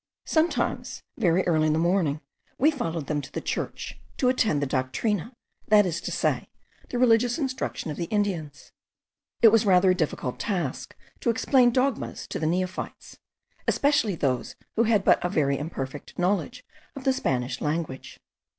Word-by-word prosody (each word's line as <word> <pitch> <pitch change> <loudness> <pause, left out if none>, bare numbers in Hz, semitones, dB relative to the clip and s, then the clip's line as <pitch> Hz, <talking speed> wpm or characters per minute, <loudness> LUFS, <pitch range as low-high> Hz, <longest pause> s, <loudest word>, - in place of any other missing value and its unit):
Sometimes, 325 +1 0
very 185 -4 +2
early 155 -3 +2
in 155 - +2
the - - +1
morning, 165 -3 +1 0.4
we 300 +5 +4
followed 165 - -3
them 150 0 -1
to 135 - -11
the - - -3
church, - - -4 0.2
to 250 - +3
attend 220 - +2
the 145 - 0
doctrina, 160 - -1 0.4
that 210 -1 +6
is 170 -2 -2
to - - -4
say, - - 0 0.4
the 245 - -3
religious 240 0 +4
instruction 260 - -3
of 150 - -6
the 170 - -2
Indians. 170 -8 -2 0.7
It 225 - +10
was 225 0 +4
rather 185 -2 +5
a - - +4
difficult 155 -7 -2
task 175 - -3 0.2
to - - 0
explain 245 +2 +4
dogmas 255 +1 -1
to - - -3
the 155 - 0
neophytes, 185 +2 -3 0.5
especially 280 -9 +2
those 130 -6 -1 0.2
who 230 - +3
had 215 -3 +3
but - - +4
a 180 - 0
very 140 -6 +1
imperfect 145 -2 -6
knowledge 200 +7 -1 0.3
of 275 - -8
the 265 - +3
Spanish 130 - -1
language. 150 -3 -3
185 Hz, 165 wpm, -26 LUFS, 155-230 Hz, 0.7 s, It